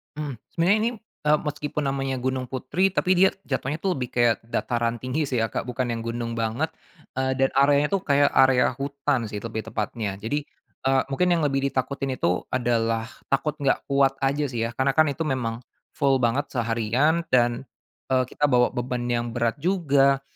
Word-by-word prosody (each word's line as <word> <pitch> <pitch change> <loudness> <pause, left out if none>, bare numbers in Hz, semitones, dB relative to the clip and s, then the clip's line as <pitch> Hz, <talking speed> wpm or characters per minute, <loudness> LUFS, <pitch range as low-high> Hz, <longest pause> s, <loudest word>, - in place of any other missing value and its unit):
Mmm, 150 -2 -4 0.2
sebenarnya 175 +5 +3
ini, 225 +2 +1 0.4
eee, 150 0 +5
meskipun 150 0 -3
namanya 135 -1 -2
Gunung 130 0 -2
Putri 130 +9 0
tapi 185 - +1
dia 190 +1 +6
jatuhnya 135 +1 -2
tuh 195 - +1
lebih 125 -2 -3
kayak 120 -2 +4
dataran 115 0 -1
tinggi 140 +4 -1
sih 125 -4 0
ya 115 - -1
Kak, - - -3
bukan 125 0 -2
yang 115 -1 -3
gunung 115 0 -3
banget, 115 +8 -1 0.5
eee, 130 0 +1
dan 135 0 +2
areanya 140 +1 +4
tuh 195 -1 +1
kayak 140 0 +4
area 130 -1 +4
hutan 140 -3 -1
sih 105 -1 -6
lebih 110 -1 -5
tepatnya 105 -1 -3
jadi, 115 +9 -3 0.4
eee, 135 0 +4
mungkin 180 +7 +2
yang 165 -2 +1
lebih 135 -1 +1
ditakutin 135 0 -2
itu 90 -6 0
adalah 115 -2 0 0.2
takut 150 +2 0
gak 140 -2 +1
kuat 140 -1 +3
aja 140 +2 +1
sih 120 -3 -2
ya - - -7
karena 135 +1 +2
kan 155 - +6
itu 160 +4 -3
memang, 120 -4 -2 0.4
full 135 -3 +3
banget 125 +4 +1
seharian 120 +7 +1
dan, 120 +1 +3 0.5
eee, 130 0 +4
kita 150 - 0
bawa 125 -3 +4
beban 125 0 -3
yang 120 -1 -1
berat 120 +1 0
juga, 140 -5 +2
130 Hz, 185 wpm, -25 LUFS, 120-145 Hz, 0.5 s, dia